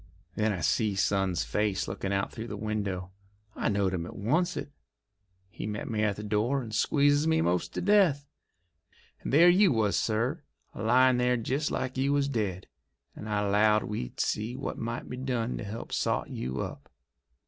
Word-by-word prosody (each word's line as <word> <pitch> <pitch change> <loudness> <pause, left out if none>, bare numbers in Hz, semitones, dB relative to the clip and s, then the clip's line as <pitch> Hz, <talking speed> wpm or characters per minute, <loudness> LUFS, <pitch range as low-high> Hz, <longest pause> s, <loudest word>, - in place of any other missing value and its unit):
Then 110 0 +1
I 95 -4 -3
see 100 +7 +1
son's 95 -2 +1
face 105 -2 -1
lookin' 95 - -4
out 100 0 -1
through 115 +1 -6
the - - -6
window. 100 -4 -3 0.4
I - - 0
knowed 100 -2 +1
him 85 -2 -3
at - - -9
oncet. 155 - -1 0.8
He - - -6
met 105 -1 -4
me 110 -1 0
at 105 -2 +1
the 105 - -7
door, 110 +6 +1
and 110 -2 -8
squeezes 145 +5 +3
me 160 0 +3
'most 90 - 0
to - - -1
death. 180 -8 +3 0.9
And - - -4
there 160 +6 +7
you 185 +1 +6
was, 110 -4 +1
sir, 120 +9 0 0.3
a - - -7
lyin' 125 +3 +4
there 125 0 +2
jest 135 +6 -1
like 130 0 -3
you 140 +2 +2
was 140 -1 +2
dead, 105 -8 -2 0.5
and 110 - -8
I 105 -1 0
'lowed 105 +1 +4
we'd 60 - -5
see 110 +4 -1
what 135 - -5
might 120 +1 -4
be 125 - -6
done 125 -2 -2
to - - -5
help 110 +3 -7
sot - - -1
you 65 +1 -3
up." - - -7
110 Hz, 185 wpm, -29 LUFS, 100-135 Hz, 0.9 s, there